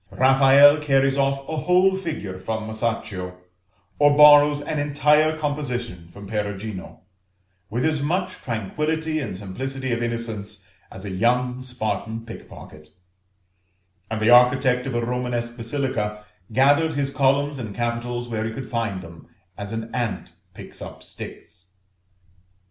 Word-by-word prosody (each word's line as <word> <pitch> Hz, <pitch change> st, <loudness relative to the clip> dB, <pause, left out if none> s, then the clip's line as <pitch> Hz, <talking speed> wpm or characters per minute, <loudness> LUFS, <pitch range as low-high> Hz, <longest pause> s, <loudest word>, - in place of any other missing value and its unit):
Raffaelle 135 Hz, +3 st, +6 dB
carries 135 Hz, -2 st, +2 dB
off 135 Hz, 0 st, 0 dB
a 160 Hz, -, -3 dB
whole 180 Hz, +4 st, +3 dB
figure 150 Hz, -, -5 dB
from 110 Hz, +4 st, -3 dB
Masaccio, 110 Hz, -5 st, -3 dB, 0.6 s
or 145 Hz, 0 st, +5 dB
borrows 145 Hz, 0 st, +8 dB
an 150 Hz, 0 st, -3 dB
entire 150 Hz, +2 st, +3 dB
composition 125 Hz, -, -4 dB
from 100 Hz, +4 st, -12 dB
Perugino, 105 Hz, -1 st, -5 dB, 0.7 s
with 120 Hz, +6 st, -1 dB
as 155 Hz, -2 st, +1 dB
much 175 Hz, +6 st, -1 dB
tranquillity 155 Hz, +8 st, -2 dB
and 110 Hz, -10 st, -5 dB
simplicity 130 Hz, +7 st, -5 dB
of 120 Hz, 0 st, -1 dB
innocence 115 Hz, -3 st, -4 dB, 0.2 s
as 95 Hz, +2 st, -10 dB
a 100 Hz, -, -5 dB
young 125 Hz, +5 st, +1 dB
Spartan 115 Hz, -2 st, -4 dB
pickpocket; 75 Hz, -8 st, -12 dB, 1.2 s
and 110 Hz, 0 st, -2 dB
the 110 Hz, +2 st, +3 dB
architect 125 Hz, +1 st, +5 dB
of 130 Hz, -, -3 dB
a 120 Hz, 0 st, 0 dB
Romanesque 120 Hz, -1 st, -3 dB
basilica 115 Hz, -4 st, -3 dB, 0.3 s
gathered 145 Hz, +6 st, +3 dB
his 140 Hz, -1 st, -1 dB
columns 140 Hz, +1 st, +1 dB
and 110 Hz, -5 st, -6 dB
capitals 120 Hz, +1 st, -3 dB
where 110 Hz, -2 st, -3 dB
he 110 Hz, -, -2 dB
could 130 Hz, +2 st, -7 dB
find 115 Hz, -6 st, -3 dB
them, 85 Hz, -1 st, -13 dB, 0.3 s
as 100 Hz, 0 st, -6 dB
an 115 Hz, 0 st, -5 dB
ant 120 Hz, -5 st, -3 dB, 0.2 s
picks -, -, -11 dB
up -, -, -9 dB
sticks. 90 Hz, +1 st, -11 dB
125 Hz, 135 wpm, -23 LUFS, 110-145 Hz, 1.2 s, borrows